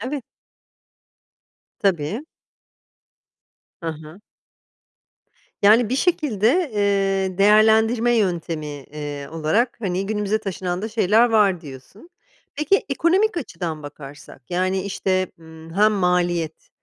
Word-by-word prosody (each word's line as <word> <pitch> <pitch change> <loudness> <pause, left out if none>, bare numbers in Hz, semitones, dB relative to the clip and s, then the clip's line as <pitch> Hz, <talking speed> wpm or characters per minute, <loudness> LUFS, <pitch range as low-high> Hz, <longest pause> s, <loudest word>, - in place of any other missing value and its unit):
evet. 260 +3 -4 1.6
Tabii. 190 - 0 1.6
Hı 165 - -5
hı. 155 +4 -12 1.4
Yani 220 +3 +5
bir 260 - 0
şekilde, 290 - +1
eee, 195 -2 0
değerlendirme 220 +3 +4
yöntemi, 170 -6 -1
eee, 145 0 -7
olarak, 165 +10 0
hani, 190 -2 -2
günümüze 210 0 -1
taşınan 185 -3 -4
da 220 - -2
şeyler 220 +1 +3
var 200 -5 +3
diyorsun. 150 - -13 0.4
Peki, 305 +7 +1
ekonomik 350 - +2
açıdan 170 - -5
bakarsak, 145 -2 -11
yani, 185 +1 0
işte, 185 -1 -1
ımm, 160 0 -13
hem 215 +2 +4
maliyet, 175 -4 0
195 Hz, 100 wpm, -22 LUFS, 165-220 Hz, 1.6 s, Yani